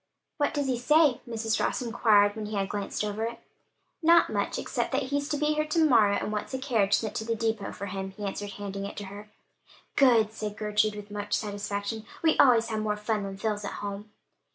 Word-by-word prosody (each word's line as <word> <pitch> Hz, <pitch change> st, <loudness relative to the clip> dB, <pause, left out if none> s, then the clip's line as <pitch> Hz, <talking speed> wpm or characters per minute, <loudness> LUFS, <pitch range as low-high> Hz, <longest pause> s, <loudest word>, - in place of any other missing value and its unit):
"What 290 Hz, 0 st, 0 dB
does 290 Hz, -1 st, 0 dB
he 255 Hz, -3 st, 0 dB
say?" 300 Hz, 0 st, +4 dB
Mrs. 225 Hz, -1 st, -1 dB
Ross -, -, 0 dB
inquired 220 Hz, -4 st, +3 dB
when 215 Hz, -1 st, -5 dB
he 215 Hz, -, -5 dB
had 195 Hz, -1 st, -1 dB
glanced 205 Hz, 0 st, -3 dB
over 210 Hz, +1 st, -2 dB
it. 230 Hz, +1 st, -3 dB, 0.6 s
"Not 335 Hz, +1 st, +5 dB
much, -, -, -1 dB
except -, -, -2 dB
that 270 Hz, +1 st, +1 dB
he's 285 Hz, +2 st, -2 dB
to 295 Hz, -, 0 dB
be 300 Hz, +1 st, +1 dB
here 305 Hz, 0 st, 0 dB
to 320 Hz, +1 st, +3 dB
morrow, 220 Hz, -8 st, +5 dB
and 205 Hz, -, -2 dB
wants 210 Hz, +4 st, -4 dB
the -, -, 0 dB
carriage 225 Hz, -7 st, +2 dB
sent 220 Hz, -, -2 dB
to -, -, -2 dB
the 230 Hz, +1 st, -1 dB
depot 225 Hz, -3 st, -2 dB
for 200 Hz, -, -6 dB
him," 190 Hz, 0 st, -4 dB
he 205 Hz, +2 st, -7 dB
answered, 200 Hz, +1 st, -4 dB
handing 200 Hz, 0 st, -5 dB
it -, -, -10 dB
to 205 Hz, -, -5 dB
her. 205 Hz, +2 st, -10 dB, 0.7 s
"Good!" 230 Hz, -6 st, +4 dB
said 215 Hz, -1 st, -5 dB
Gertrude, 210 Hz, 0 st, +1 dB
with 205 Hz, 0 st, -9 dB
much 205 Hz, 0 st, -2 dB
satisfaction. 205 Hz, +1 st, -3 dB, 0.2 s
"We 320 Hz, -1 st, +4 dB
always 235 Hz, -4 st, +5 dB
have 220 Hz, -1 st, -1 dB
more 210 Hz, -1 st, -1 dB
fun 210 Hz, 0 st, -1 dB
when 195 Hz, -1 st, -6 dB
Phil's 210 Hz, 0 st, -2 dB
at 200 Hz, -, -4 dB
home." 205 Hz, +1 st, -6 dB
215 Hz, 225 wpm, -28 LUFS, 205-245 Hz, 0.7 s, Not